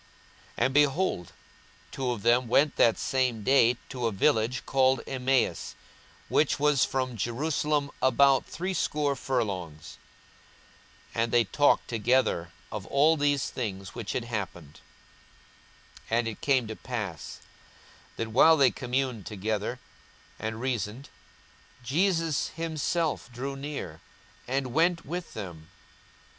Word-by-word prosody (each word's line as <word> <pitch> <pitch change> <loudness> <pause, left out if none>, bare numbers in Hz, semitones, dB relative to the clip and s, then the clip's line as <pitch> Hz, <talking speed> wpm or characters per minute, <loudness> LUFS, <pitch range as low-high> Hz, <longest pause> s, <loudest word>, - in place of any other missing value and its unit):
42:024:013 - - +2
And, 130 - 0
behold, 145 - +1 0.6
two 130 -2 -2
of 120 -5 -3
them 120 +1 +3
went 140 +5 +3
that 115 - +4
same 125 -5 0
day 125 -1 +4
to 125 -3 -2
a - - -1
village 115 +3 +1
called 130 -2 +3
Emmaus, 130 0 0 0.5
which 150 -1 +2
was 145 -2 +3
from 130 -2 -1
Jerusalem 145 +5 -1
about 135 0 +4
threescore 150 -5 -1
furlongs. 95 - -3 1.1
42:024:014 115 - +1
And 115 - -2
they 120 -1 +5
talked 145 +8 +2
together 115 -7 +1 0.2
of 105 -1 -6
all 150 +4 +4
these 145 -2 0
things 95 -6 -5
which 115 -4 -5
had 125 - -1
happened. 90 -10 -6 1.3
42:024:015 115 - +2
And 120 -1 +1
it 110 - -6
came 135 -4 +2
to 110 0 -6
pass, 105 - -6 0.8
that, 115 - -3
while 160 +8 +6
they 135 -4 +5
communed 125 -4 -2
together 110 +3 -2 0.6
and 110 0 -4
reasoned, 120 0 -3 0.7
Jesus 165 - +1
himself 165 -3 -2
drew 135 +3 -5
near, 135 - -6 0.5
and 130 -1 -2
went 165 +2 +2
with 175 +4 -6
them. 85 -6 -8
130 Hz, 125 wpm, -28 LUFS, 110-140 Hz, 1.3 s, while